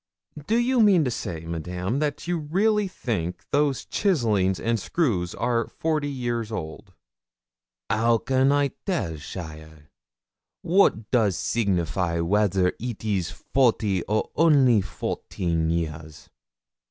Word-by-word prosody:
'Do 225 - +2
you 245 +1 +2
mean 195 -6 +5
to 125 - 0
say, 90 -8 -4
Madame, 90 - -3
that 150 -1 -2
you 175 -1 0
really 200 +7 +1
think 100 - -4
those 145 -2 +1
chisellings 110 - +1
and 115 0 0
screws 100 - -1
are 120 -1 0
forty 155 -3 -1
years 120 -4 -3
old?' 80 -7 -7 0.9
'How 115 +1 +2
can 130 +4 +2
I 145 -1 +2 0.2
tell, 175 - -1
cheaile? 80 -1 -9 0.8
What 165 - +2
does 110 -8 +2
signify 90 -5 0
whether 95 +1 +2
it 120 -2 -5
is 95 -6 0
forty 110 -8 +1
or 110 +1 -1
only 140 -9 +5
fourteen 85 -3 -3
years? 80 -2 -4
115 Hz, 120 wpm, -25 LUFS, 90-145 Hz, 0.9 s, mean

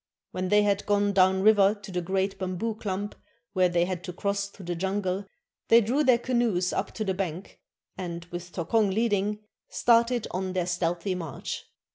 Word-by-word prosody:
When 185 0 -3
they 210 +1 +5
had 200 -1 0
gone 205 0 +2
down 190 0 +4
river 205 -1 +5
to 205 -1 -11
the 180 -1 -1
great 190 +2 -1
bamboo 185 +4 -2
clump 205 -1 -4 0.4
where 185 -2 +3
they 175 0 +2
had 180 -1 -4
to 180 - -6
cross 200 +2 -1
through 200 -2 -13
the 175 0 -2
jungle, 190 +1 -2 0.4
they 230 - +7
drew 245 +7 +1
their 255 -4 +5
canoes 235 -7 0
up - - -2
to 215 - -3
the 190 - 0
bank, 185 -1 -5 0.4
and, 170 -2 -5
with 175 0 -6
Tokong 200 +5 +1
leading, 210 0 0 0.3
started 235 0 +3
on 185 +1 -3
their 180 -2 0
stealthy 175 +1 -1
march. 165 -6 -5
195 Hz, 180 wpm, -27 LUFS, 180-210 Hz, 0.4 s, they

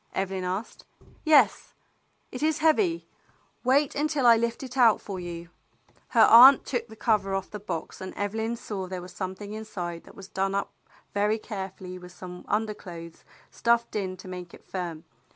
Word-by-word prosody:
^" - - -42
Evelyn 190 -1 -2
asked. 185 +5 -4 0.4
"Yes; 285 -9 +4 0.6
it - - -6
is 310 0 +2
heavy. 330 +3 +2 0.6
Wait 270 +3 +3
until 295 -2 0
I 235 -1 +8
hft 235 +2 -2
it 255 -1 -8
out 235 -4 +5
for 195 -2 -6
you.'* 170 -1 -7 0.6
Her 230 - +3
aunt 255 +5 +9
took 240 -3 -2
the 220 - -12
cover 205 -4 +1
off 195 -1 -4
the 210 - -6
box, 175 -5 -6
and 185 - -5
Evelyn 220 +3 -2
saw 200 -5 -5
there 185 0 -5
was 180 0 -10
something 190 +2 -6
inside 180 -6 -6
that - - -15
was 195 -1 -10
done 195 0 -1
up 200 - -2 0.4
very 210 +2 +2
carefully 190 -4 -7
with 180 0 -12
some 180 0 -10
underclothes 185 -6 -4 0.3
stuffed 235 -1 +1
in 190 -3 -2
to 185 - -12
make 180 -1 -8
it - - -20
firm. 170 -4 -5
205 Hz, 175 wpm, -27 LUFS, 185-235 Hz, 0.6 s, aunt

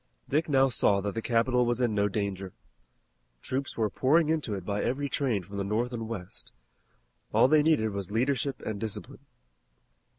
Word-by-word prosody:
Dick 155 +3 0
now 135 -1 +4
saw 105 -5 +3
that 100 0 -3
the 115 - -3
capital 125 +2 +2
was 120 0 0
in 120 -3 +1
no 100 0 +2
danger. 95 -2 -3 0.9
Troops 135 +1 -3
were 110 -2 +2
pouring 150 +9 +2
into 155 -10 0
it 95 -2 -7
by 100 +1 -1
every 140 +4 -1
train 130 -8 -1
from 100 +3 -9
the 100 - -1
north 115 +5 -1
and 115 -2 -4
west. 95 -5 -7 0.8
All - - +5
they 155 +2 +5
needed 150 -9 +2
was 100 -2 -5
leadership 135 +5 -1
and 110 -2 -3
discipline. 110 -1 -6
115 Hz, 175 wpm, -28 LUFS, 100-135 Hz, 0.9 s, All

